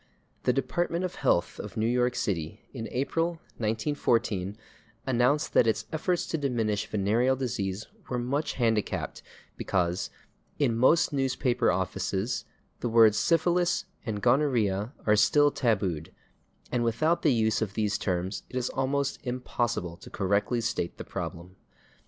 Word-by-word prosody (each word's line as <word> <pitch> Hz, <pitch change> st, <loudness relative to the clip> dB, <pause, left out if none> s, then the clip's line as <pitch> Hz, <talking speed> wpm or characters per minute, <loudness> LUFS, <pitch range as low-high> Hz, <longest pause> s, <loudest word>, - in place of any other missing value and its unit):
The -, -, +5 dB
Department 170 Hz, +7 st, -1 dB
of 180 Hz, -, -4 dB
Health 125 Hz, -10 st, +1 dB
of 105 Hz, 0 st, -7 dB
New 110 Hz, -, +1 dB
York 125 Hz, +1 st, +2 dB
City, 90 Hz, +1 st, -2 dB
in 115 Hz, -4 st, -5 dB
April, 165 Hz, +6 st, -1 dB, 0.2 s
1914, 110 Hz, -4 st, 0 dB, 0.5 s
announced 130 Hz, +4 st, +2 dB
that 115 Hz, -, +5 dB
its 110 Hz, -, +1 dB
efforts 175 Hz, +3 st, 0 dB
to 160 Hz, -, -2 dB
diminish 115 Hz, -7 st, 0 dB
venereal 110 Hz, +6 st, +2 dB
disease 110 Hz, -6 st, -3 dB, 0.2 s
were 125 Hz, -, -1 dB
much 140 Hz, +5 st, -1 dB
handicapped 115 Hz, -4 st, -1 dB, 0.4 s
because 90 Hz, -1 st, 0 dB, 0.5 s
"in 130 Hz, -6 st, +2 dB
most 140 Hz, +7 st, +4 dB
newspaper 130 Hz, -2 st, +1 dB
offices 95 Hz, +4 st, -1 dB, 0.3 s
the 120 Hz, -, -2 dB
words 110 Hz, -2 st, +6 dB
/syphilis/ 175 Hz, +2 st, +2 dB, 0.2 s
and 105 Hz, -3 st, -4 dB
/gonorrhea/ 120 Hz, -6 st, +2 dB
are 105 Hz, -, +5 dB
still 145 Hz, +7 st, +5 dB
tabooed, 95 Hz, -, 0 dB, 0.6 s
and 125 Hz, -1 st, +1 dB
without 120 Hz, +9 st, +1 dB
the 150 Hz, -, +4 dB
use 110 Hz, -3 st, +2 dB
of 105 Hz, -2 st, -2 dB
these 105 Hz, -2 st, 0 dB
terms 95 Hz, +1 st, -2 dB
it -, -, -10 dB
is 125 Hz, -1 st, 0 dB
almost 140 Hz, +1 st, -1 dB
impossible 120 Hz, -8 st, -2 dB
to -, -, -12 dB
correctly 100 Hz, +5 st, 0 dB
state 100 Hz, -6 st, -2 dB
the -, -, -6 dB
problem." 90 Hz, +2 st, -6 dB
120 Hz, 140 wpm, -28 LUFS, 105-135 Hz, 0.6 s, words